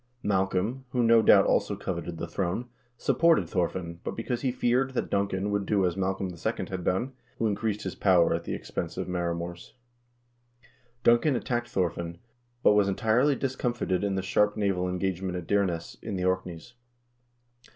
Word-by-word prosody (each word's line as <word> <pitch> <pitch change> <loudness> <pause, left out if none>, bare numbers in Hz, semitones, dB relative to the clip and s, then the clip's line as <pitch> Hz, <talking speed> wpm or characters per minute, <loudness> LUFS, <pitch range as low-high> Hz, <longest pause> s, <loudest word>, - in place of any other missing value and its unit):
Macbeth, 95 +3 0 0.2
who, 125 -1 +2
no 115 0 +6
doubt, - - +6
also - - +1
coveted 85 -2 -4
the 85 - -4
throne, 95 +6 -2 0.3
supported 165 - +3
Thorfinn, 85 -1 -2
also - - -4
because 120 +1 -3
he 130 - +1
feared 130 +2 +1
that - - -2
Duncan 100 0 0
would 100 -1 -1
do 100 -3 +2
as 90 -2 0
Malcolm 95 0 -1
II. 85 - -3
had 95 -2 -4
done, 120 +11 0 0.2
who 115 - 0
increased 105 0 -1
his 95 - -3
power 90 -4 +4
at 85 0 -2
the - - -3
expense - - -5
of - - -2
the 90 - -5
maor 85 -1 -1
mors. 85 +1 -7 1.3
Duncan 120 +5 +4
attacked 120 0 -2
Thorfinn, 85 -2 -2 0.5
but - - +6
was 105 -1 +4
entirely 120 +8 +2
discomfited 120 -8 -1
in 100 -1 0
the 95 - -1
sharp 105 +2 +2
naval 95 -3 0
engagement 90 0 -2
at 90 - -6
Dyrness, 95 -4 0
in 110 -3 -4
the 90 -1 -1
Orkneys. 95 +3 -2
95 Hz, 170 wpm, -28 LUFS, 90-115 Hz, 1.3 s, no